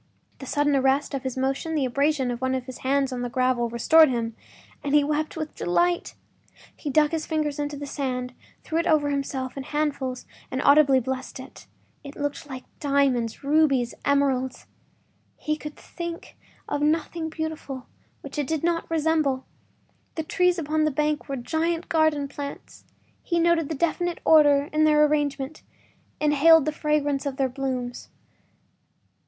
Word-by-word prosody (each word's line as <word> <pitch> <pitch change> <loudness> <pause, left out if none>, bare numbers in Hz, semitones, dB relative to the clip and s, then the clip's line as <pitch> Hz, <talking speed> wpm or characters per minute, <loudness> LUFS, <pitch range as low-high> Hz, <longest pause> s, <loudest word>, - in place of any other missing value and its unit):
The 270 - -8
sudden 290 +1 +1
arrest 270 +2 +2
of 275 - -2
his 260 -1 -4
motion, 270 +5 -1
the 285 -3 +1
abrasion 275 0 +1
of 240 +1 -5
one 260 0 0
of 255 -1 -3
his 260 -1 -9
hands 270 0 0
on 245 - -4
the 245 - -3
gravel, 255 -1 +1
restored 310 +7 +5
him, 230 -2 -2 0.5
and 285 0 +1
he 295 - +5
wept 305 +2 -2
with 310 -1 -5
delight. 345 - 0 0.6
He 295 - -5
dug 300 +2 +3
his 325 -1 -3
fingers 300 -2 -1
into 290 0 -3
the 285 - -6
sand, 255 -3 -3 0.3
threw 325 - -1
it 335 - -1
over 295 -2 +3
himself 270 -2 -3
in 275 - -4
handfuls 275 -3 -2 0.2
and 260 - -3
audibly 280 -2 +6
blessed 260 +1 -5
it. 260 - -12 0.4
It 280 0 -9
looked 290 0 -4
like 260 -1 -7 0.2
diamonds, 275 -5 +1
rubies, 275 -4 +2
emeralds; 270 -2 +1 0.7
he 305 - -1
could 300 -1 -8
think 340 -1 -8 0.3
of 290 - -2
nothing 320 +2 0
beautiful 315 -5 -5 0.4
which - - -7
it 290 - -1
did 320 0 -2
not 335 0 0
resemble. 310 -4 +1 0.7
The 320 - -2
trees 360 +3 +2
upon 310 -1 0
the 305 - +3
bank 300 +1 -1
were 275 - -2
giant 325 +6 -2
garden 315 -3 +2
plants; 280 0 -8 0.4
he 340 - -1
noted 335 -2 +2
a - - -1
definite 340 +3 -1
order 290 -2 +5
in 310 0 +3
their 300 -1 +5
arrangement, 290 -1 -1 0.6
inhaled 300 +1 +5
the 310 - 0
fragrance 295 -2 0
of 270 -1 -4
their 270 -2 +1
blooms. 255 -2 -4
290 Hz, 165 wpm, -25 LUFS, 265-310 Hz, 0.7 s, audibly